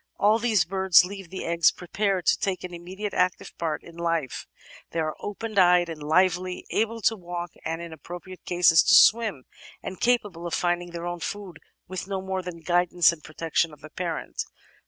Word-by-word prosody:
All 215 +2 +4
these 220 -6 +2
birds 190 -1 +5
leave 195 -2 -8
the 190 - -6
egg 170 0 -3 0.2
prepared 190 0 -1
to - - +5
take 195 -3 -2
an 180 -1 -7
immediate 190 +4 -6
active 180 0 0
part 165 -2 -2
in 170 0 -14
life; 165 -6 -2 0.4
they 165 - -3
are 155 -1 -1
open 210 0 -3
eyed 180 -1 +5
and 160 -2 -7
lively, 180 +3 +1
able 225 +1 0
to 225 - +3
walk 175 -2 -6
— - - -23
and, 165 +1 -3
in 170 -1 -8
appropriate 175 +3 -10
cases, 175 -3 +5
to - - +5
swim 220 - +5 0.2
— - - -19
^and 190 - -6
capable 205 -8 0
of 170 - -1
finding 175 0 0
their 170 0 -6
own 175 0 -4
food 190 -2 -6 0.3
with 185 0 -5
no 195 -1 -2
more 190 0 -3
than 180 -1 -7
the 165 - -15
guidance 175 0 +3
and 160 -3 -10
protection 160 +1 -1
of 150 -1 -15
the 155 +1 -12
parent. 175 -1 -4
175 Hz, 200 wpm, -26 LUFS, 170-190 Hz, 0.4 s, birds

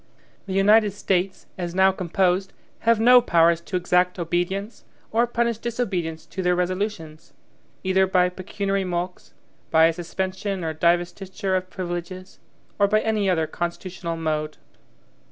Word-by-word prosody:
The 190 - -4
United 205 +1 +4
States, 190 -1 -1
as 175 -1 -4
now 190 0 +5
composed, 185 +1 0 0.4
have 230 -2 +4
no 245 +2 +7
powers 170 -6 +3
to 185 - -6
exact 180 +1 +1
obedience, 175 +5 -2 0.3
or 235 +2 +2
punish 235 -1 -1
disobedience 190 -10 -3
to 190 - -6
their 180 -1 +2
resolutions, 180 -3 -3 0.5
either 190 0 +3
by 180 -1 +3
pecuniary 195 +2 -2
mulcts, 180 0 -4 0.3
by 160 0 +5
a 165 - +3
suspension 190 +2 -4
or 160 -1 -2
divestiture 180 +4 0
of 185 0 -2
privileges, 185 0 -6 0.4
or 200 - +5
by 215 +2 +2
any 215 -3 0
other 165 -3 +2
constitutional 170 0 -4
mode. 155 -1 -2
185 Hz, 135 wpm, -23 LUFS, 175-195 Hz, 0.5 s, no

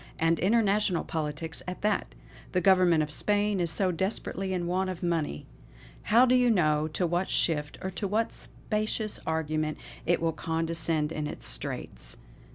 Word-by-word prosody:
and 165 0 +2
international 205 -2 +2
politics 160 0 -3
at 180 +2 -6
that. 210 -1 +1 0.5
The 180 - +3
Government 180 -4 +4
of 150 - -5
Spain 205 +3 +1
is 170 -2 +1 0.2
desperately 190 0 -2
in 180 -2 -1
want 185 +2 0
of 180 -2 -6
money. 165 - -1 0.6
How 235 +4 +5
do 250 - +3
you 250 -1 +4
know 155 -7 +3
to 160 +3 -1
what 175 +2 0
shift, 150 -3 +1
or 190 - -2
to 200 +2 -3
what 220 +3 0
specious 215 0 -3
argument 155 -1 -1 0.3
it 175 - +3
will 165 -1 0
condescend 165 -1 -1
in 150 -2 -3
its - - -6
straits. - - -3
175 Hz, 160 wpm, -28 LUFS, 160-200 Hz, 0.6 s, How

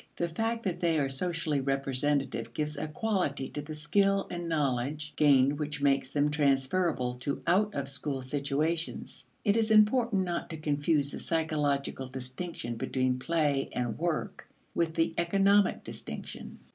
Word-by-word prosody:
The 170 - 0
fact 225 +7 -2
that 180 -3 -2
they 170 -2 +2
are 140 -2 +1
socially 160 0 -1
representative 135 +1 0
gives 150 0 -2
a 145 - -3
quality 155 -6 -1
to 145 - -4
the 155 +1 -7
skill 195 +6 +2
and 175 -1 -4
knowledge 145 0 -1
gained 140 -1 +4
which 150 -1 -2
makes 140 -2 +2
them 145 +1 +1
transferable 140 -1 +1
to 140 +3 -3
out 205 +5 +2
of 140 -1 -2
school 135 0 -3
situations. 145 +5 -2 0.2
It 205 -1 +4
is 225 -1 +2
important 215 -1 +4
not 175 -2 -3
to 160 - -5
confuse 145 -1 +1
the - - -6
psychological 145 -5 -1
distinction 130 -1 -5
between 130 +1 0
play 145 -2 +1
and 120 -2 -1
work 170 -1 -2 0.2
with 165 -1 0
the 165 0 +1
economic 195 +3 +3
distinction. - - -7
150 Hz, 150 wpm, -30 LUFS, 140-170 Hz, 0.2 s, gained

